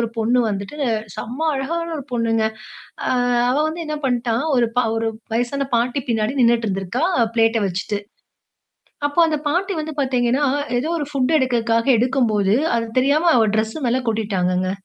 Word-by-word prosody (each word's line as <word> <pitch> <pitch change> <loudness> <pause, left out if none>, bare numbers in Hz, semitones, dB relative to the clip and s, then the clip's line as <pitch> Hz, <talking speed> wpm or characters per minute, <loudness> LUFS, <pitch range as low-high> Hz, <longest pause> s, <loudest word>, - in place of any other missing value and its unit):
ஒரு 230 - 0
பொண்ணு 235 +3 +2
வந்துட்டு 200 +6 -4 0.4
செம்ம 250 +6 -6
அழகான 335 +5 -3
ஒரு 285 - -6
பொண்ணுங்க. 230 -2 +1 0.7
ஆ - - +1 0.4
அவ 255 - +1
வந்து 325 +2 -4
என்ன 305 0 -3
பண்ட்டா, 240 -2 0 0.2
ஒரு 240 -1 +3
பா 250 - +4
ஒரு 225 0 0 0.2
வயசான 255 +4 -1
பாட்டி 245 +4 0
பின்னாடி 225 +3 0
நின்னுட்டு 235 -1 +3
இருந்திருக்கா 190 - -2 0.3
ப்ளேட்ட 225 -1 +3
வச்சிட்டு. 195 +3 -3 1.1
அப்போ 290 - -8
அந்த 305 -1 0
பாட்டி 375 +6 0
வந்து 310 0 -5
பாத்தீங்கன்னா, 260 +1 +1 0.3
ஏதோ 280 +6 -2
ஒரு 295 - -3
ஃபுட் 275 +2 +1
எடுக்குறதுக்காக 235 -2 +1
எடுக்கும்போது, 225 -5 +2 0.2
அது 230 0 -2
தெரியாம 300 +6 +3
அவ 225 -2 +4
டிரெஸ் 220 +3 -1
மேலே 250 +2 +1
கொட்டிட்டாங்கங்க. 185 -4 0
240 Hz, 155 wpm, -20 LUFS, 225-275 Hz, 1.1 s, பா